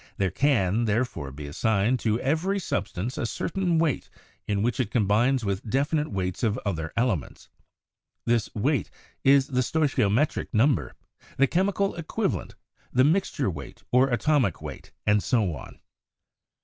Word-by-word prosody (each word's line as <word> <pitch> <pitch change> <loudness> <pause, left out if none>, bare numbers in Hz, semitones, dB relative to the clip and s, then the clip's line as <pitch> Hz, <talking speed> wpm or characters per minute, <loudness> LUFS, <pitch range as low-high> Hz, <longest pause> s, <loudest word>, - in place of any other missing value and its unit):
"There 95 -2 +1
can, 115 - +2
therefore, 110 - -1
be 70 +2 -8
assigned 110 - +1
to 110 0 0
every 165 +9 0
substance 125 - -3
a 120 - -1
certain 175 +5 -1
weight 160 -5 0 0.4
in 100 -1 0
which 120 +3 0
it 120 -5 0
combines 115 +3 +2
with 100 +2 -3
definite 145 +5 +1
weights 95 -2 -2
of 115 +1 +1
other 80 -5 -2
elements. 115 - -1 0.8
This 120 -2 +1
weight 130 - 0 0.3
is 135 0 +5
the 125 -2 +1
stoichiometric 140 -3 +1
number, 125 +5 +2 0.4
the 135 - +5
chemical 195 +5 +1
equivalent, 185 +5 -3 0.4
the 130 - +4
mixture 150 - +1
weight 75 -4 -9
or 130 +2 +4
atomic 120 - +1
weight, - - -9
and 105 -1 +3
so 105 -10 +1
on. - - -11
120 Hz, 140 wpm, -26 LUFS, 100-145 Hz, 0.8 s, is